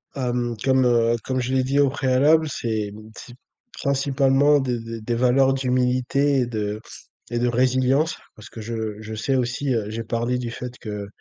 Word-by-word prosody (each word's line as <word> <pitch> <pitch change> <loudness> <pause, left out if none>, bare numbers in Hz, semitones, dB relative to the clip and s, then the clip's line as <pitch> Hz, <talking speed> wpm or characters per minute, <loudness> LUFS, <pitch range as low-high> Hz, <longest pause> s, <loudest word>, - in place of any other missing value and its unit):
Hem, 120 -3 -1
comme, 130 -1 +3
heu, 120 -1 +3
comme 130 -1 -1
je 125 +2 -2
l'ai 130 -1 +2
dit 135 +2 +1
au 140 -1 +4
préalable, 145 +4 +3
c'est 110 -5 -2
hem 110 +2 -12
c'est 120 - -11 0.4
principalement 140 +1 +2
des 125 -3 -1
des 115 0 -7
des 120 +2 -2
valeurs 130 +2 +3
d'humilité 130 +2 +1
et - - +1
de 105 -2 -3 0.5
et 120 - -1
de 120 - +1
résilience, 130 +5 +2 0.2
parce 105 -1 -13
que - - -10
je, 115 +2 -6
heu, 110 -2 -4
je 110 0 -7
sais 135 +5 -1
aussi, 130 +2 -1
heu 110 -3 -1
j'ai 115 +1 -4
parlé 115 +2 -1
du 120 -2 -4
fait 125 +1 -7
que 105 -2 -6
125 Hz, 195 wpm, -23 LUFS, 115-135 Hz, 0.5 s, au